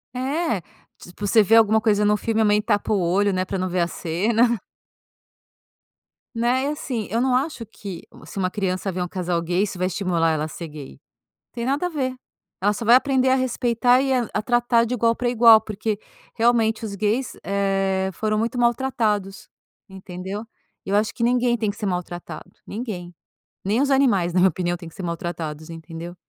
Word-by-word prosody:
É, 270 - -1 0.4
tipo 190 +3 -7
você 220 +1 +5
vê 225 +4 +4
alguma 220 -1 +5
coisa 210 -2 +2
no 210 0 +4
filme 225 0 0
a - - +4
mãe 210 0 +3
tapa 210 -1 0
o 200 - +2
olho, 190 +4 +2
né, 185 0 0
pra 195 - -3
não 185 0 -2
ver 180 0 0
a 170 - +2
cena. 215 +8 +1 1.8
Né, 245 +3 +1
e - - 0
assim, 260 -7 -3
eu 230 +3 0
não 255 -1 +2
acho 265 -3 -1
que 200 -4 -9 0.2
se - - -11
uma 185 -1 0
criança 190 -1 -2
ver 180 0 -4
um 180 - -1
casal 175 -2 -2
gay 175 +4 0
isso 195 -3 -4
vai 185 +1 0
estimular 170 -3 0
ela 155 -1 -1
a - - -4
ser 165 +1 -7
gay, 150 -2 -9
não 65 - -16 0.6
tem 235 0 -4
nada 280 +6 0
a - - 0
ver, 265 -6 -2 0.5
ela 205 +2 +2
só 230 - -5
vai 235 +2 +7
aprender 265 -1 +3
a 260 - +4
respeitar 245 0 +2
e 275 - 0
a 245 -3 +1
a - - 0
tratar 240 0 +2
de 240 - -3
igual 230 -1 +2
pra 245 0 -1
igual 230 -2 +7
porque 215 0 -3 0.4
realmente 225 -1 +2
os 205 -2 -4
gays, 215 +6 -1
eh, 195 -1 0
foram 215 +2 -1
muito 230 +3 -1
maltratados 230 -5 0 0.4
entendeu? 190 +2 -7 0.4
E - - -7
eu 200 - +1
acho 215 +1 +1
que 235 - -3
ninguém 240 0 +2
tem 215 -2 -1
que 205 - -5
ser 210 - -4
maltratado, 180 -2 -5 0.2
ninguém, 195 -6 -6 0.5
nem 210 +6 +1
os 280 0 +1
animais 220 -11 +3
na 185 - +2
minha 190 - +6
opinião 175 +1 -2
tem 170 -2 -10
que - - -16
ser - - -7
maltratados, 165 -2 -5
entendeu? 165 +1 -8
210 Hz, 205 wpm, -23 LUFS, 185-240 Hz, 1.8 s, vai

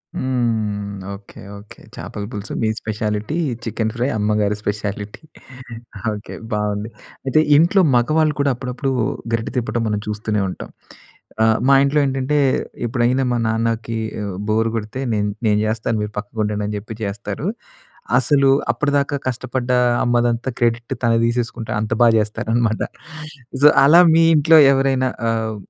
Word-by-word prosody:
హ్మ్. 110 -5 -1 0.2
Okay. 100 0 -12 0.2
Okay. 105 +1 -14 0.2
చాపల 105 - -7
పులుసు 105 -1 -6
మీ 110 - +2
స్పెషాలిటీ. 105 +6 -3 0.3
చికెన్ 110 -1 -2
ఫ్రై 120 +2 0
అమ్మగారి 105 0 +1
స్పెషాలిటీ. 105 +2 -4 0.9
ఓకే. 105 0 -7 0.2
బాగుంది. 105 +1 -2 0.4
అయితే 135 +3 +3 0.2
ఇంట్లో 175 +5 +4
మగవాళ్ళు 155 +5 +2
కూడా 140 -1 +2
అప్పుడప్పుడు 130 +2 -3 0.4
గరిట 115 0 -1
తిప్పడం 120 -1 -1
మనం 105 -1 -1
చూస్తూనే 105 0 -2
ఉంటాం. - - -8 0.7
ఆహ్, 110 0 +4
మా 140 - +6
ఇంట్లో 145 +2 +2
ఏంటంటే 135 +2 0 0.5
ఎప్పుడైనా 125 +3 +1
మా 120 - +1
నాన్నకి 115 0 -1 0.3
ఆహ్, 100 -2 -5
బోర్ 110 +1 +2
గొడితే 110 +3 -4
నేను 105 -1 0 0.2
నేను 105 -1 +3
జేస్తాను 110 +1 -1
మీరు 105 0 -6
పక్కకుండండి 105 0 -3
అని 105 - -4
జెప్పి 110 +2 -8
చేస్తారు. 105 - -4 0.7
అసలు 140 -3 +3 0.2
అప్పటిదాకా 145 -1 0
కష్టపడ్డ 125 0 -3 0.3
అమ్మదంతా 120 0 +1
క్రెడిట్ 120 0 0
తను 115 -1 +3
తీసేసుకుంట 115 -1 -2
అంత 110 +1 -3
బా 120 - +7
చేస్తారనమాట. 110 +1 -1 0.8
సో 150 - +10 0.2
అలా 165 +5 +7
మీ 165 0 +5
ఇంట్లో 160 +2 +6
ఎవరైనా 135 -1 +1 0.2
ఆహ్, 110 -1 -2
115 Hz, 135 wpm, -20 LUFS, 105-130 Hz, 0.9 s, సో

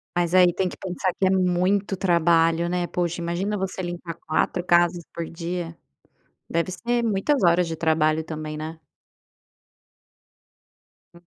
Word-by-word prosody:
Mas 175 -1 0
aí 180 -2 +6
tem 190 - 0
que - - -10
pensar 185 0 -2
que 190 - +3
é - - +3
muito 190 +2 +1
trabalho, 170 -2 +3
né. 175 0 -1
Poxa, 175 -1 -2
imagina 180 +5 -2
você 190 0 -3
limpar 175 -1 -5
4 160 +3 0
casas 175 -1 +3
por 170 - -4
dia? 170 0 -5 0.7
Deve 170 +3 -1
ser 235 +5 -1
muitas 225 +6 +1
horas 175 0 +4
de 165 - -3
trabalho 160 -1 +1
também, 155 -1 -6
né. 160 +1 -7 2.3
Hum. 170 0 -18
175 Hz, 140 wpm, -24 LUFS, 165-185 Hz, 2.3 s, aí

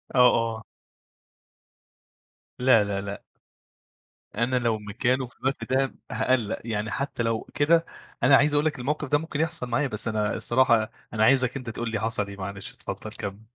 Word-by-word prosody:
آه، - - +4
آه. 115 -1 -1 2.0
لا، 125 -4 +5
لا، 100 -1 -2
لأ. 100 0 -7 1.1
أنا 120 +4 0
لو 120 -3 +1
مكانه 125 +5 -1
في 120 - -21
الوقت 135 +1 -2
ده 135 0 +1 0.2
هاقلّق. 120 -5 0
يعني 110 -1 -2
حتّى 135 -1 -2
لو 115 -1 -1
كده، 165 +3 +3 0.4
أنا 140 - +7
عايز 145 +2 +4
أقول 145 +1 +2
لك 150 -4 -1
الموقف 150 +4 -2
ده 145 +2 +3
ممكن 160 -2 -5
يحصل 160 -5 -1
معايا، 120 +4 +1
بس 110 -4 -1
أنا 105 -2 0
الصراحة 115 -3 +3 0.2
أنا 110 -1 +2
عايزك 130 +1 +3
أنت 125 -3 -6
تقول 115 +1 -4
لي 105 - -1
حصل 110 -1 0
إيه، 100 0 -9
معلش، 100 +1 -6
اتفضّل - - -7
كمِّل. 100 +1 -6
120 Hz, 170 wpm, -26 LUFS, 110-135 Hz, 2.0 s, أنا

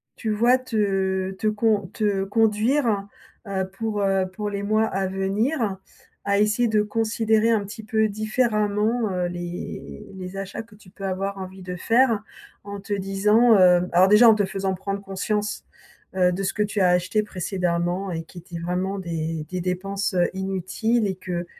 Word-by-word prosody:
tu 225 - -4
vois, 235 +4 +4
te 195 -6 -1
te 195 +3 -3
con 215 -2 +1
te 205 -3 0
conduire, 220 +2 +2 0.4
heu, 190 -1 -2
pour, 220 -2 -2
heu, 195 -1 +2
pour 210 +2 -4
les 200 0 -4
mois 215 +2 +2
à 195 -2 -1
venir, 200 +4 -1 0.5
à 200 0 +1
essayer 215 +3 +2
de 215 -1 +3
considérer 220 +1 +1
un 215 -3 +1
petit 220 +2 -9
peu 220 0 +1
différemment, 215 0 0
heu, 180 -1 -1
les 175 - -7
les 185 0 -7
achats 195 +3 -5
que 220 -2 -19
tu 200 -3 -18
peux 195 +1 -12
avoir 195 +1 -2
envie 190 0 -8
de 180 0 -6
faire, 230 +3 +2 0.4
en 200 0 -7
te 200 +1 -5
disant, 210 +4 +4
heu 180 -1 +5
alors 180 +2 +5
déjà 210 +4 +7
en 220 - +6
te 205 -2 +1
faisant 190 0 -2
prendre 195 +1 -4
conscience, 205 +2 -3 0.5
heu, 180 -1 +3
de 190 +2 -3
ce 190 - -1
que 210 - +1
tu 210 0 -2
as 185 - +5
acheté 180 +4 +1
précédemment 180 -1 -2
et 165 -2 -3
qui 165 - -16
étaient 175 0 -8
vraiment 180 +3 -2
des 165 -3 -3
des 185 - -3
dépenses, 190 +3 -2
heu, 175 -1 +2
inutiles 195 +4 -1
et 190 - -2
que 180 -1 -4
200 Hz, 180 wpm, -24 LUFS, 185-215 Hz, 0.5 s, déjà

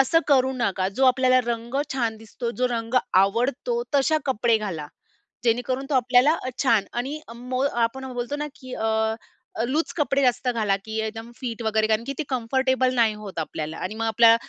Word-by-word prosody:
असं 295 +5 +4
करू 265 -2 +4
नका, 190 -6 0
जो 230 +8 0
आपल्याला 255 0 +5
रंग 235 +1 -3 0.2
छान 235 -4 -1
दिसतो, 225 +2 -5
जो 250 +1 0
रंग 230 0 -3 0.3
आवडतो 250 - 0
तशा 285 +3 +3
कपडे 235 -2 +2
घाला. 180 -8 -4 0.6
जेणेकरून 245 +3 0
तो - - -1
आपल्याला 255 +3 +4
अ, - - -1
छान 230 -7 +4
आणि 270 +6 -3
अ, 230 - -9 0.5
आपण 265 +3 -3
बोलतो 245 +4 -3
ना 295 0 -3
की 260 -4 -10
अ, 220 0 0 0.5
लूज 305 +6 0
कपडे 280 -2 +1
जास्त 250 -1 +1
घाला 215 -5 +1
की 220 0 -5
एकदम 225 +2 -5
फिट 240 -3 -5
वगैरे 220 0 +2
कारण 220 +1 +1
की 275 - -2
ते - - +1
कम्फर्टेबल 260 +1 +1
नाही 230 -3 +3
होत 205 -5 -7
आपल्याला 155 0 -4
आणि 185 +4 -4
मग 225 +1 -2
आपल्या 225 0 +6
240 Hz, 180 wpm, -24 LUFS, 220-260 Hz, 0.6 s, आपल्या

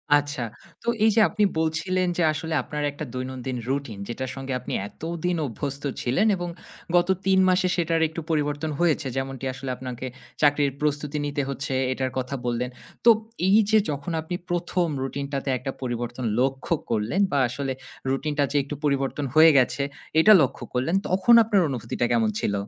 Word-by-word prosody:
আচ্ছা। 145 -2 0 0.4
তো - - -13 0.2
এইযে 220 0 +4
আপনি 210 0 0 0.2
বলছিলেন 160 +3 0
যে, - - +1
আসলে 160 +1 -4
আপনার 150 +2 -4
একটা 145 - -6
দৈনন্দিন 130 0 -4
রুটিন, 135 -6 -2
যেটার 130 +2 -4
সঙ্গে 135 -1 -4
আপনি - - -6
এতদিন 170 +7 -3
অভ্যস্ত 140 +2 -5 0.2
ছিলেন 135 - +2
এবং 175 -1 -4 0.5
গত 175 0 +4 0.2
৩ 190 -1 +4
মাসে 185 0 +3
সেটার 165 -1 +1
একটু 160 +1 -6
পরিবর্তন 150 0 -1
হয়েছে। 160 -5 +2
যেমনটি 135 0 -3
আসলে 135 0 -6
আপনাকে 125 -1 -6 0.4
চাকরির 145 -1 +4
প্রস্তুতি 150 0 -1
নিতে 145 0 -1
হচ্ছে 135 0 -3 0.2
এটার 130 0 -2
কথা 130 +2 -2
বললেন। 120 +1 -1 0.4
তো - - +9 0.4
এইযে 215 +2 +5
যখন 145 +3 -4
আপনি 170 +3 -4
১ম 175 0 0
রুটিনটাতে 140 +1 -3
একটা 125 +2 -4
পরিবর্তন 120 0 -3
লক্ষ্য 135 +5 0 0.2
করলেন 115 - 0
বা 145 - +1
আসলে 135 +2 -3 0.4
রুটিনটা 145 +2 0
যে - - +1
একটু 145 +2 -6
পরিবর্তন 140 0 0
হয়ে 160 +1 +8
গেছে, 135 +2 +2 0.4
এটা 215 +7 +8
লক্ষ্য 135 -1 -1
করলেন। 130 +8 0
তখন 185 +5 +4
আপনার 210 -3 +3
অনুভূতিটা 120 -2 -2
কেমন 115 -2 +3
ছিল? - - 0
145 Hz, 160 wpm, -25 LUFS, 130-165 Hz, 0.5 s, তো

